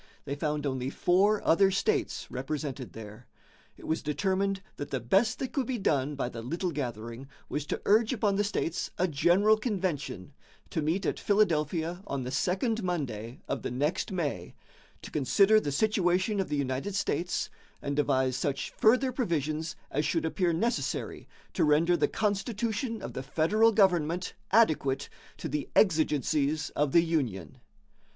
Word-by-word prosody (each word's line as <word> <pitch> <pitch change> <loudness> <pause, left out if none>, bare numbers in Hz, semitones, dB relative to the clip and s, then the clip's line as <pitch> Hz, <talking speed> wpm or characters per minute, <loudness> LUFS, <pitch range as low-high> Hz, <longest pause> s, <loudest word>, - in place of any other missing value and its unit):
They 140 - -3
found 150 0 -2
only 130 -2 -1
four 195 +8 +2
other 190 +4 +5
states 370 - 0
represented 135 -1 -4
there. 105 -1 -10 0.5
It - - -12
was 160 - -1
determined 190 +5 -1
that 145 - -5
the 135 - -2
best 195 - +2
that 260 - -4
could 270 -5 -1
be 255 - -1
done 145 - 0
by 135 - -2
the 115 -2 -6
little 170 +9 -2
gathering 120 -3 -5 0.2
was 150 0 -3
to - - -2
urge 215 +2 +4
upon 210 -5 +1
the 205 - +2
states 185 -4 -2
a 185 - +2
general 175 +8 +4
convention, 185 - -3 0.4
to 160 - -1
meet 165 +6 0
at - - -1
Philadelphia 170 -3 +1
on 140 -2 -3
the 125 - -4
second 200 - 0
Monday 130 - -4
of 140 - -2
the - - -3
next 145 +10 -1
May, 170 -6 -3 0.5
"to - - -9
consider 195 +9 +4
the 145 - -3
situation 190 +3 +1
of 190 - -1
the 150 - -1
United 140 +8 -2
States, 180 -2 -1 0.3
and 140 0 -3
devise 130 -3 +1
such 135 +1 -2
further 255 +4 +3
provisions 160 - -2 0.2
as 150 - 0
should 150 +1 0
appear 175 +2 +1
necessary 230 +9 -2 0.3
to 175 - +1
render 160 +3 +4
the - - +2
constitution 220 +2 -2
of - - -6
the - - -4
federal 165 +11 +3
government 180 -4 +2 0.2
adequate 155 -11 +2 0.3
to - - -5
the 150 -1 -3
exigencies 155 - +2
of 145 -1 0
the 170 +2 +5
Union." 115 - -2
165 Hz, 160 wpm, -29 LUFS, 140-200 Hz, 0.5 s, other